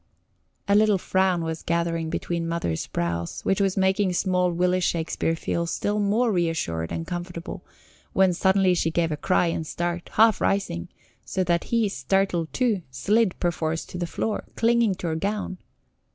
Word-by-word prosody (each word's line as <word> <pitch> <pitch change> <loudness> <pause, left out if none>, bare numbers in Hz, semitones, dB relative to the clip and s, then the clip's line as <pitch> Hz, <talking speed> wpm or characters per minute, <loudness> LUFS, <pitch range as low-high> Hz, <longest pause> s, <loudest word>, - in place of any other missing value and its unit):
A 200 - +3
little 210 -1 +5
frown 185 -2 +1
was 160 0 -3
gathering 165 -1 -1
between 170 0 -2
Mother's 165 - -2
brows, 85 0 -3
which 195 +1 +2
was 195 -1 +1
making 190 0 +2
small 180 0 +1
Willy 180 +2 +1
Shakespeare 165 -2 0
feel 170 +1 -2
still 205 +5 -1
more 215 +4 +2
reassured 165 - -1
and 165 - -3
comfortable, 175 0 -6 0.5
when 190 -1 +3
suddenly 190 +1 +3
she 170 -2 +1
gave 165 0 0
a - - 0
cry 180 +4 +2
and 165 -1 -2
start, 175 +1 -3
half 220 -1 +5
rising, 140 - 0 0.4
so 190 - -1
that 170 -1 +1
he, 230 -2 +1
startled 175 +2 0
too, 230 -7 +1
slid 205 - +1
perforce 165 -2 -1
to 180 - -7
the 175 - -2
floor, 215 +5 -2
clinging 230 -3 +3
to 180 - -7
her 160 - -1
gown. 195 +1 -3
180 Hz, 165 wpm, -25 LUFS, 165-195 Hz, 0.5 s, little